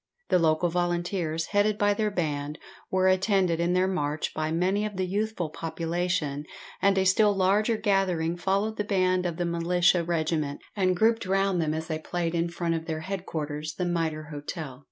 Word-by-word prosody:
The 180 - +4
local 160 +1 +2
volunteers, 175 -1 -1
headed 205 0 +2
by 205 0 +3
their 215 +1 0
band, 150 -5 -2 0.3
were 185 0 +2
attended 185 -2 +2
in 170 +1 +1
their 185 +1 +3
march 150 -5 -2
by 155 0 -2
many 185 +5 +1
of 210 -1 -3
the 185 - 0
youthful 200 -3 -2
population, 165 -3 -2 0.4
and 195 0 +3
a 190 - +3
still 205 +2 +4
larger 205 +4 +2
gathering 185 -5 +1
followed 195 +5 0
the 210 - 0
band 185 -2 +1
of 170 -2 -4
the 175 - -1
militia 170 +1 +2
regiment, 160 -3 -1 0.2
and 185 -3 +2
grouped 225 0 +2
round 195 -1 +2
them 155 -1 0
as 160 0 -3
they 160 -1 -3
played 170 +1 -2
in 170 0 0
front 170 0 -1
of 165 -1 -3
their 160 -1 -3
headquarters, 155 -5 -4
the 180 - -2
Mitre 160 -3 -2
Hotel. 145 -2 -6
175 Hz, 180 wpm, -27 LUFS, 160-195 Hz, 0.4 s, The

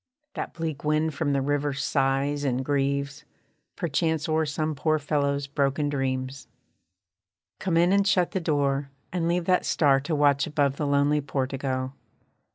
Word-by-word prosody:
That - - -5
bleak 160 -4 -4
wind 155 +1 +1
from 145 0 -1
the 140 -1 +1
river 145 0 0
sighs 140 +1 0
and 130 -1 -1
grieves, 140 0 -1 0.5
Perchance 160 -2 0
o'er 160 0 +1
some 155 +1 -1
poor 155 +2 +1
fellow's 145 -1 0
broken 140 +1 0
dreams. 130 -1 -3 1.1
Come 180 -3 0
in, 175 +2 +4
and 200 0 +3
shut 185 -3 +2
the 190 - -1
door, 140 -4 0 0.2
and 170 -2 0
leave 175 0 0
that 180 0 +3
star 140 -3 +3
To 155 +4 -2
watch 145 -1 +3
above 140 -2 0
the 150 - -1
lonely 145 +1 +2
portico. 130 -1 -2
145 Hz, 155 wpm, -26 LUFS, 140-155 Hz, 1.1 s, in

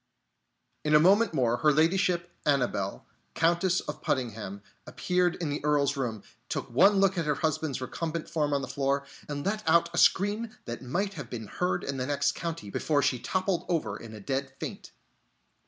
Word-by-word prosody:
In 150 0 +3
a - - +8
moment 200 +7 +5
more 120 -6 +1
Her 150 +2 +4
Ladyship, 175 +3 +2
Annabelle, 140 -4 0 0.3
Countess 175 +2 +2
of 150 - -7
Puddingham, 110 -6 -3 0.2
appeared 180 -1 +1
in 165 -4 -3
the 145 - -3
Earl's 145 -1 +2
room, 120 -6 -3 0.3
took - - -3
one 195 - +6
look 195 -2 +3
at 165 - -2
her 150 - +2
husband's 155 -2 -1
recumbent 160 +4 -4
form 150 -2 0
on 140 -1 0
the - - -4
floor, 140 0 0 0.2
and 145 -1 -4
let 210 +2 0
out 170 +1 +4
a 175 - +1
scream 210 +4 +3 0.2
that 120 -1 -5
might 190 +11 -2
have 145 -9 -7
been 115 -3 -5
heard 180 - -1
in 140 -1 -3
the 130 0 -2
next 145 -1 +1
county, 165 -12 -5
before 145 +4 +1
she 130 -3 +1
toppled 185 - -1
over 170 -3 0
in 110 -1 -9
a - - -9
dead 135 +6 -2
faint. - - -7
150 Hz, 185 wpm, -28 LUFS, 135-175 Hz, 0.3 s, a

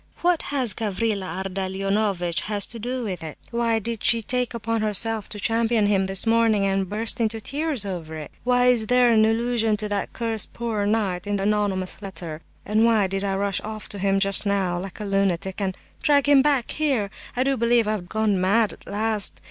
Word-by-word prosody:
What 350 -2 +3
has 260 -7 +2
Gavrila 200 -4 -2
Ardalionovitch 195 0 -1
to 235 - -6
do 250 +3 -3
with 185 -6 -4
it? 155 -2 -7
Why 235 -1 +1
did 225 0 -1
she 230 -1 +4
take 250 +1 -2
upon 230 0 -2
herself 215 0 0
to 210 - -6
champion 225 0 +1
him 195 -2 +2
this 195 +2 -1
morning, 225 -3 +3
and 195 -1 0
burst 225 +3 +1
into 225 0 0
tears 280 -1 -2
over 170 -5 -5
it? 155 -2 -8
Why 245 0 +3
is 240 -3 +3
there 245 0 +4
an 220 -1 +5
allusion 225 -1 +1
to 210 0 -2
that 205 -1 -2
cursed 225 -2 -2
'poor 220 -4 -2
knight' 205 -4 -1
in 205 - 0
the 195 - -2
anonymous 200 -2 -1
letter? 170 -5 -7 0.2
And 215 +2 +2
why 225 -3 +4
did 195 +1 -2
I 195 -1 -1
rush 195 -1 -1
off 215 0 -7
to 205 - -4
him 195 0 +1
just 195 -1 +5
now 195 -4 0
like 190 +3 -8
a 210 - -4
lunatic, 195 -1 -1
and 190 -1 -2 0.2
drag 285 -2 +3
him 285 -2 +6
back 280 -4 +1
here? 265 -10 0 0.3
I 255 - +3
do 275 0 +1
believe 235 -2 +2
I've 205 -4 -3
gone 215 -3 0
mad 205 +4 +2
at - - -17
last. 215 0 +3
210 Hz, 200 wpm, -23 LUFS, 195-230 Hz, 0.3 s, him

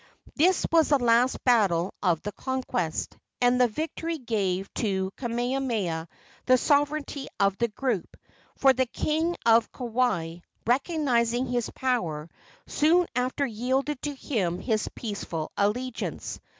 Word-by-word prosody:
This 350 +4 +3
was 325 -1 +4
the 290 - +5
last 245 0 +2
battle 195 -8 +3
of 175 -5 +1
the 205 - -3
conquest, 250 - -3 0.2
and 245 +1 +3
the 250 - +6
victory 320 +6 -3
gave 200 -7 -1
to 190 -3 -1
Kamehameha 235 -9 -2 0.4
the 255 0 +6
sovereignty 285 0 0
of 200 -1 +3
the 235 - +2
group, 230 -3 -3 0.4
for 270 -1 +5
the 260 0 +1
king 320 +7 -1
of 230 0 +4
Kauai, 230 -10 -1 0.3
recognizing 250 -3 +1
his 245 -2 -1
power, 170 -12 -2 0.3
soon 340 +4 +3
after 255 +3 0
yielded 260 +4 -1
to 290 -1 -3
him 195 -11 -1
his 215 +2 -1
peaceful 200 -8 -4
allegiance. 230 +5 -2
245 Hz, 125 wpm, -27 LUFS, 205-270 Hz, 0.4 s, the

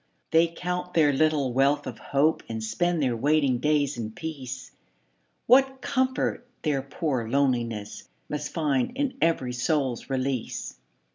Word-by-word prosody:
They 165 +1 +5
count 180 +1 -4
their 150 -3 +5
little 145 -3 +2
wealth 140 +3 +2
of - - -6
hope 145 +3 +1
And 110 -1 -4
spend 175 +7 0
their 125 -3 +1
waiting 140 0 +2
days 145 -3 +1
in 110 -2 -3
peace, 130 -1 -7 0.7
What 265 +2 +5
comfort 260 -1 -1 0.2
their 145 -4 +1
poor 135 -4 -2
loneliness 120 -6 -1 0.2
Must 150 0 -4
find 150 - 0
in 275 -2 -1
every 135 -7 +1
soul's 130 -1 -1
release! 130 -2 -3
145 Hz, 135 wpm, -26 LUFS, 130-165 Hz, 0.7 s, They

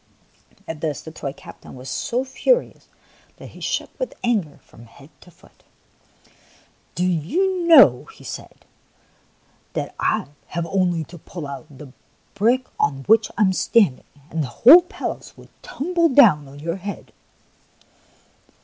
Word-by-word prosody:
At 160 -2 -7
this 150 -4 -2
the 160 - -10
toy 140 -3 -6
captain 170 -1 -13
was 130 +1 -11
so 245 - -2
furious 485 - 0 0.5
that - - -11
he - - -15
shook - - -3
with - - -4
anger 210 -11 -1
from 115 - -17
head 140 +6 -18
to - - -17
foot. 175 - -24 1.3
"Do 180 - 0
you 340 - 0
know," 265 - +7
he - - -16
said, - - -10 0.5
" - - -38
that - - -4
I - - 0 0.2
have 170 -1 -4
only 175 -2 0
to 170 +2 -13
pull 170 0 -8
out 140 -2 -8
the 140 -2 -13 0.4
brick 240 +6 +1
on 135 -1 0
which 220 +4 +3
I 215 - +3
am 190 -2 +3
standing, 190 - +2 0.3
and 160 - -2
the 140 - -2 0.2
whole 305 +10 +10
palace 350 - -7
will - - -16
tumble 335 +3 0
down 200 - +5
on 135 +1 -13
your 165 +4 -4
head 200 +2 -8
180 Hz, 150 wpm, -21 LUFS, 150-245 Hz, 1.3 s, whole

